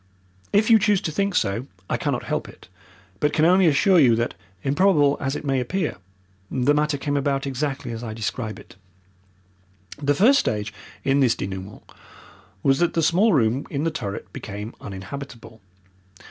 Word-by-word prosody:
If 215 +3 +3
you 225 - +8
choose 205 -1 +3
to 155 - -3
think 200 +3 -1
so 110 +7 0 0.2
I - - 0
cannot - - -2
help - - -3
it, - - -16 0.5
but 150 - +1
can 155 - +3
only 185 +1 +5
assure 170 +5 +4
you 125 -6 +5
that, 120 +1 -1 0.3
improbable 145 -1 +3
as 135 +1 -2
it 150 - -6
may 135 -2 +1
appear, 155 - -2 0.5
the 130 +3 +2
matter 150 0 +1
came 145 +1 -2
about 140 -1 0
exactly 135 -2 -3
as 115 +1 -6
I 110 -2 -5
describe 110 0 -4
it. - - -15 1.3
The 145 0 +2
first 260 - +5
stage 105 -1 -2 0.3
in 135 +1 +2
this 130 -4 +3
denouement 95 +1 -6 0.8
was 135 +1 +3
that 175 -1 +1
the 165 - +2
small 185 +8 +4
room 125 - +1
in 140 0 -2
the 165 - 0
turret 100 -10 -6
became 105 +2 -7
uninhabitable. 115 +3 -9
140 Hz, 170 wpm, -23 LUFS, 115-160 Hz, 1.3 s, you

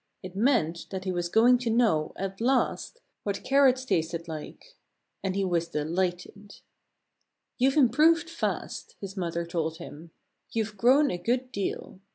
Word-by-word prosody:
It 185 0 -8
meant 200 - +1
that 190 -1 -5
he 185 - -2
was 175 -1 -2
going 240 +5 +5
to 245 -2 -2
know, 220 -10 +2
at 195 +2 -5
last, 265 - 0 0.2
what 200 -1 -3
carrots 265 -1 +3
tasted 170 -4 -1
like. 155 -2 -9 0.5
And 190 -1 -1
he 195 -1 0
was 170 -2 0
delighted. 180 +6 -3 1.0
"You've 265 +3 +3
improved 310 +6 +4
fast," 330 0 -4
his 195 -1 -7
mother 170 -2 -2
told 165 -1 -2
him. 160 +2 -10 0.4
"You've 220 -2 -2
grown 260 +8 +4
a 175 - -3
good 250 +6 -1
deal. 200 -2 -4
195 Hz, 150 wpm, -27 LUFS, 175-250 Hz, 1.0 s, going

